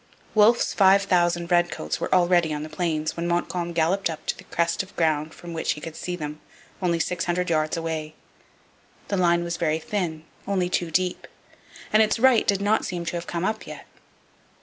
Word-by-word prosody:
Wolfe's 220 Hz, +3 st, +4 dB
5,000 180 Hz, -3 st, +3 dB
redcoats 175 Hz, -, +1 dB
were -, -, -3 dB
already 175 Hz, -2 st, +3 dB
on 150 Hz, -, -4 dB
the 155 Hz, -, -7 dB
Plains 155 Hz, -1 st, -2 dB
when 170 Hz, 0 st, -3 dB
Montcalm 175 Hz, 0 st, -1 dB
galloped 170 Hz, +3 st, +1 dB
up 160 Hz, -1 st, -7 dB
to -, -, -1 dB
the -, -, -14 dB
crest 170 Hz, 0 st, 0 dB
of 190 Hz, +1 st, -12 dB
ground 155 Hz, -2 st, +1 dB
from 175 Hz, -1 st, -10 dB
which 160 Hz, -, 0 dB
he -, -, -9 dB
could 160 Hz, +1 st, -8 dB
see 180 Hz, -, -4 dB
them, 150 Hz, -2 st, -6 dB, 0.4 s
only 170 Hz, -2 st, +1 dB
six 170 Hz, +1 st, -1 dB
hundred 180 Hz, 0 st, -1 dB
yards 155 Hz, +1 st, +1 dB
away. 160 Hz, -2 st, -4 dB, 0.9 s
The 200 Hz, -, 0 dB
line 170 Hz, -1 st, +3 dB
was 170 Hz, -1 st, -3 dB
very 160 Hz, -1 st, +1 dB
thin, 165 Hz, -2 st, -3 dB, 0.2 s
only 185 Hz, -3 st, 0 dB
two 175 Hz, -1 st, -1 dB
deep, 180 Hz, +2 st, -1 dB, 0.7 s
and 215 Hz, -, +6 dB
its 215 Hz, 0 st, +2 dB
right 250 Hz, -1 st, +4 dB
did 200 Hz, -1 st, +2 dB
not 210 Hz, +2 st, +2 dB
seem 175 Hz, -1 st, -4 dB
to 170 Hz, -, -3 dB
have 170 Hz, 0 st, -5 dB
come 170 Hz, +1 st, -2 dB
up 215 Hz, +2 st, -2 dB
yet. -, -, -9 dB
175 Hz, 195 wpm, -24 LUFS, 160-185 Hz, 0.9 s, and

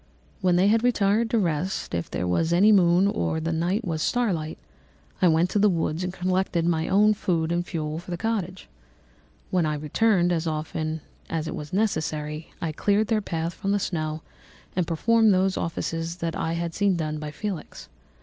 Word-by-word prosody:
When 180 Hz, -2 st, +3 dB
they 185 Hz, +3 st, +4 dB
had 225 Hz, +2 st, +3 dB
retired 225 Hz, -1 st, +2 dB
to 230 Hz, -, +1 dB
rest, 180 Hz, -, -1 dB
if 85 Hz, -1 st, -2 dB
there 90 Hz, -, -2 dB
was 160 Hz, -, +1 dB
any 195 Hz, +5 st, +5 dB
moon 180 Hz, -2 st, +5 dB
or 160 Hz, -, 0 dB
the 165 Hz, +1 st, -2 dB
night 180 Hz, +7 st, 0 dB
was 160 Hz, -3 st, -2 dB
star 240 Hz, +2 st, +1 dB
light, 155 Hz, -1 st, -4 dB, 0.6 s
I 185 Hz, -, +6 dB
went 165 Hz, +2 st, +3 dB
into 210 Hz, -, +1 dB
the 210 Hz, +1 st, +5 dB
woods 165 Hz, -1 st, -1 dB
and 180 Hz, -, -2 dB
collected 185 Hz, -2 st, 0 dB
my 165 Hz, -2 st, +1 dB
own 210 Hz, +2 st, +4 dB
food 170 Hz, -5 st, -1 dB
and 175 Hz, 0 st, +1 dB
fuel 155 Hz, -3 st, -4 dB
for 175 Hz, -, -12 dB
the 175 Hz, -, -3 dB
cottage. 190 Hz, -3 st, -3 dB, 0.8 s
When 180 Hz, -2 st, +2 dB
I 150 Hz, -, -1 dB
returned, 175 Hz, +5 st, +2 dB
as 165 Hz, -1 st, 0 dB
often 155 Hz, 0 st, -3 dB, 0.3 s
as 160 Hz, -1 st, -2 dB
it -, -, -4 dB
was 150 Hz, 0 st, -7 dB
necessary, 155 Hz, -6 st, -2 dB
I 165 Hz, -, -2 dB
cleared 205 Hz, +6 st, +1 dB
their 220 Hz, -2 st, +2 dB
path 165 Hz, -2 st, -3 dB
from 195 Hz, +2 st, -2 dB
the -, -, +3 dB
snow 155 Hz, -4 st, -3 dB, 0.5 s
and 180 Hz, -3 st, 0 dB
performed 220 Hz, +5 st, +3 dB
those 190 Hz, +1 st, +2 dB
offices 165 Hz, 0 st, -3 dB
that 170 Hz, -2 st, -3 dB
I 165 Hz, -, -1 dB
had 170 Hz, 0 st, -3 dB
seen 200 Hz, 0 st, +2 dB
done 155 Hz, -2 st, -2 dB
by 150 Hz, 0 st, -5 dB
Felix. 180 Hz, +1 st, -6 dB
175 Hz, 195 wpm, -25 LUFS, 160-195 Hz, 0.8 s, I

